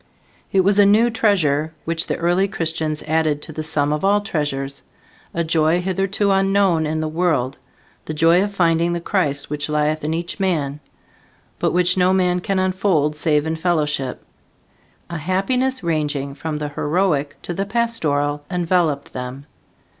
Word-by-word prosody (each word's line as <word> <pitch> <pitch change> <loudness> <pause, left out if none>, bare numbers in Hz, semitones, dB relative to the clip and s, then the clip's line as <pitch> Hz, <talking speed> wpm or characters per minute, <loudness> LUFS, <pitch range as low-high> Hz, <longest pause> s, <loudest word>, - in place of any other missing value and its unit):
It 190 - +4
was 200 +2 +3
a - - +8
new 225 +4 +4
treasure 160 -9 +1
which 165 0 -1
the - - -1
early 175 +3 +2
Christians 160 -4 -2
added 155 -1 +1
to 160 - -7
the 155 - -4
sum 150 -1 +1
of 150 - -3
all 200 +1 +4
treasures, 140 -7 -3 0.5
a 170 - -1
joy 160 +1 +2
hitherto 195 +2 0
unknown 195 -4 +2
in 155 +1 -1
the 155 - -1
world 155 -6 0 0.5
the 155 - -4
joy 165 +3 +4
of 205 +1 -1
finding 170 -2 +2
the 175 - -1
Christ 150 -7 -1
which 150 0 -2
lieth 150 +1 0
in 155 - -1
each 170 +4 -4
man, 150 -7 -1 0.8
but - - +1
which 180 +1 +2
no 180 +1 +4
man 180 -1 +2
can 195 +2 -2
unfold 185 -5 +1
save 150 -1 +1
in 160 0 -1
fellowship. 150 -5 -1 0.9
A 170 - -3
happiness 220 - 0
ranging 150 -4 -1
from 155 +1 -4
the 150 0 -3
heroic 145 -1 -1
to 175 - -4
the 195 +3 -3
pastoral 150 -11 0
enveloped 175 -5 0
them. 125 +2 -6
165 Hz, 160 wpm, -20 LUFS, 150-185 Hz, 0.9 s, a